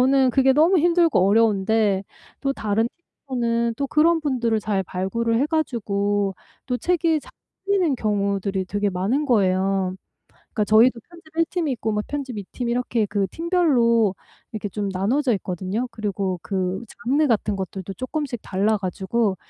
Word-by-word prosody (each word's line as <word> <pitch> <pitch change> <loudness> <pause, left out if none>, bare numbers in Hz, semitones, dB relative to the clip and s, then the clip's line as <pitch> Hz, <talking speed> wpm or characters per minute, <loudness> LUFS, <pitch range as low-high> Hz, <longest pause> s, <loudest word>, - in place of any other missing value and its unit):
저는 265 0 +4
그게 265 +1 +4
너무 325 +7 +4
힘들고 335 - +3
어려운데 210 -1 +2 0.4
또 275 - 0
다른 220 -2 0 0.4
팀원은 235 -2 0
또 280 - -1
그런 325 +3 +3
분들을 240 -6 0
잘 205 -2 -1
발굴을 225 +6 -1
해 285 - +2
가지고 205 - 0 0.3
또 250 - 0
책이 330 0 +1
잘 - - -15 0.3
풀리는 385 -7 +2
경우들이 200 -3 -1
되게 205 +2 -1
많은 200 +11 0
거예요. 190 -4 +1 0.6
그러니까 210 - +1
저희도 230 +2 +5
편집 330 -2 -17
1 330 - +4
팀이 335 -6 -1
있고 225 -2 -2
막 210 0 0
편집 270 -6 -4
2 200 - -5
팀 245 -2 -3
이렇게 240 -2 0
그 200 -1 0
팀별로 255 - +2 0.4
이렇게 215 -2 -4
좀 205 +1 -3
나눠져 230 +7 +1
있거든요. 190 +5 -3
그리고 200 -4 -3
그 190 0 -2 0.2
장르 285 +5 +3
같은 215 -4 +1
것들도 190 0 -5
쪼끔씩 255 - -4
달라 205 +3 +1
가지고 195 +2 -1
225 Hz, 325 characters per minute, -23 LUFS, 200-275 Hz, 0.6 s, 저희도